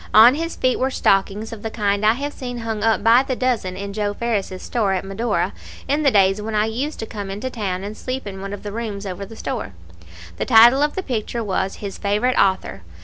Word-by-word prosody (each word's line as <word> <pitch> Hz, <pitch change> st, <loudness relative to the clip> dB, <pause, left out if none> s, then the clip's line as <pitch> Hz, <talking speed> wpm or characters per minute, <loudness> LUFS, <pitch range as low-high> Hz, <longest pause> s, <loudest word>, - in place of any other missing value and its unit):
On 230 Hz, +4 st, +9 dB
his 330 Hz, +3 st, -3 dB
feet 255 Hz, -1 st, +1 dB
were 260 Hz, -, +1 dB
stockings 205 Hz, -1 st, +1 dB
of 220 Hz, -, -8 dB
the 225 Hz, -, -3 dB
kind 205 Hz, -2 st, 0 dB
I 215 Hz, +1 st, +5 dB
have 285 Hz, +4 st, -4 dB
seen 245 Hz, -2 st, -6 dB
hung 225 Hz, -2 st, -3 dB
up 225 Hz, -2 st, +2 dB
by 230 Hz, +3 st, +6 dB
the 265 Hz, -1 st, -2 dB
dozen 235 Hz, -8 st, -1 dB
in 200 Hz, +1 st, -5 dB
Joe 205 Hz, -1 st, -2 dB
Ferris's 205 Hz, -5 st, -2 dB
store 215 Hz, -6 st, 0 dB
at 190 Hz, 0 st, -2 dB
Medora, 195 Hz, +5 st, -1 dB, 0.3 s
in 290 Hz, +2 st, +1 dB
the 285 Hz, -, +4 dB
days 195 Hz, -2 st, +3 dB
when 215 Hz, +1 st, -4 dB
I 210 Hz, 0 st, +3 dB
used 255 Hz, +8 st, -3 dB
to -, -, -3 dB
come 205 Hz, -3 st, -6 dB
in 195 Hz, +1 st, -5 dB
to 260 Hz, -, -3 dB
town 195 Hz, -5 st, -3 dB
and 205 Hz, +2 st, -6 dB
sleep 255 Hz, +1 st, -5 dB
in 195 Hz, -1 st, -7 dB
one 195 Hz, 0 st, -5 dB
of 205 Hz, -, -7 dB
the 205 Hz, -, -5 dB
rooms 210 Hz, -2 st, -5 dB
over 195 Hz, +1 st, -5 dB
the 225 Hz, -, -11 dB
store. 225 Hz, -, -4 dB, 0.6 s
The -, -, -2 dB
title 235 Hz, +5 st, +7 dB
of 295 Hz, 0 st, +1 dB
the 380 Hz, -, -2 dB
picture 235 Hz, -3 st, -3 dB
was 190 Hz, -1 st, -1 dB
"His 200 Hz, -2 st, -7 dB
Favorite 210 Hz, +5 st, +1 dB
Author." 190 Hz, -, +1 dB
215 Hz, 240 wpm, -21 LUFS, 200-245 Hz, 0.6 s, On